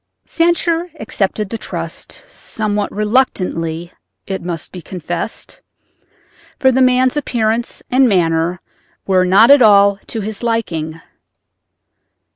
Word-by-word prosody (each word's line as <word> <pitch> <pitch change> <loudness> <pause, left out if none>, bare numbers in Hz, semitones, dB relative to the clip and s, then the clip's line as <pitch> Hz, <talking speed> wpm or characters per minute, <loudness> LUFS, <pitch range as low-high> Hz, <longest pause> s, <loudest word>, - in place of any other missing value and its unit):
Sancher 340 0 0
accepted 210 -1 -2
the 230 - -4
trust—somewhat 215 - -4
reluctantly 180 -7 -1 0.3
it 190 -1 -4
must 170 -2 -5
be 180 - -8
confessed, 175 +3 -6 1.0
for 265 - +4
the 260 +1 +2
man's 255 +1 +3
appearance 235 -5 -1
and 255 0 +4
manner 170 -2 +1 0.5
were 185 -1 +3
not 200 +7 +6
at 285 -2 +7
all 200 -2 +5
to 225 - -4
his 210 +1 -5
liking. 170 -9 -2
210 Hz, 105 wpm, -17 LUFS, 180-250 Hz, 1.0 s, at